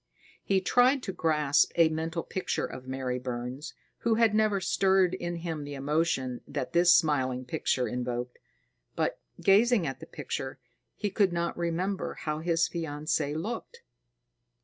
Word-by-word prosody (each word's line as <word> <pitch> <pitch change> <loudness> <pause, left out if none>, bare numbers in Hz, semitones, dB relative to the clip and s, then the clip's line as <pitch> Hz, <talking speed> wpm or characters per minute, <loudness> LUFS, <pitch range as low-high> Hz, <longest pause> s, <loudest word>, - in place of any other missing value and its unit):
He 195 -1 +2
tried 250 +6 +3
to 190 - -4
grasp 150 -4 +2
a 165 -2 +5
mental 165 +1 -3
picture 180 -3 -2
of 130 0 -9
Mary 130 -1 -2
Burns, 125 +4 -5 0.2
who 230 -1 +2
had 225 -2 +4
never 215 -2 +3
stirred 190 -1 +3
in 175 -2 -3
him 165 -3 -4
the 145 0 -6
emotion 140 -3 0
that 140 -3 -4
this 175 0 +6
smiling 135 -7 +2
picture 125 0 0
invoked. 125 0 -4 0.6
But, - - -1 0.2
gazing 210 0 +4
at 135 - -4
the - - -10
picture, 135 0 -5 0.4
he 205 -2 -2
could 195 -2 +3
not 170 0 -1
remember 175 +3 -2
how 150 0 -3
his 165 0 +2
fiancée 155 -2 -2
looked. 240 - -6
165 Hz, 150 wpm, -29 LUFS, 135-190 Hz, 0.6 s, this